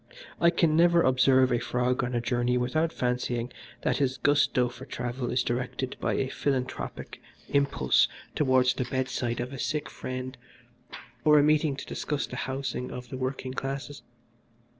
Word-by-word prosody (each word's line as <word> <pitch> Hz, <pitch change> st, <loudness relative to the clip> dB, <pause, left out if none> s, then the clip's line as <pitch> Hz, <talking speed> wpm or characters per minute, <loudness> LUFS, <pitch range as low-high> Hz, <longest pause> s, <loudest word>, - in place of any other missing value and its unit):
I 170 Hz, -, +6 dB
can 165 Hz, -2 st, +2 dB
never 170 Hz, 0 st, +5 dB
observe 130 Hz, 0 st, +4 dB
a 120 Hz, -, +2 dB
frog 125 Hz, +1 st, 0 dB
on 125 Hz, 0 st, -2 dB
a 120 Hz, -, +1 dB
journey 120 Hz, 0 st, +1 dB
without 155 Hz, +7 st, 0 dB
fancying 125 Hz, -2 st, -2 dB, 0.3 s
that -, -, +1 dB
his 135 Hz, -2 st, 0 dB
gusto 145 Hz, -3 st, +3 dB
for 125 Hz, +1 st, -10 dB
travel 125 Hz, -1 st, -4 dB
is 125 Hz, 0 st, +1 dB
directed 125 Hz, +1 st, -3 dB
by -, -, 0 dB
a 135 Hz, -, 0 dB
philanthropic 130 Hz, -1 st, -3 dB, 0.3 s
impulse 140 Hz, 0 st, +3 dB, 0.3 s
towards 130 Hz, -3 st, +3 dB
the 125 Hz, -, -2 dB
bedside 125 Hz, -2 st, -2 dB
of 125 Hz, +3 st, -4 dB
a 135 Hz, -, -7 dB
sick 150 Hz, +3 st, -2 dB
friend 130 Hz, 0 st, -5 dB, 0.9 s
or 150 Hz, 0 st, +6 dB
a 145 Hz, -, +6 dB
meeting 150 Hz, -1 st, +3 dB
to 140 Hz, -, -7 dB
discuss 145 Hz, -1 st, -2 dB
the -, -, -8 dB
Housing 130 Hz, -1 st, -3 dB
of 125 Hz, -1 st, -8 dB
the 130 Hz, -, -5 dB
Working 130 Hz, 0 st, -3 dB
Classes. 135 Hz, +2 st, -5 dB
130 Hz, 160 wpm, -28 LUFS, 125-140 Hz, 0.9 s, I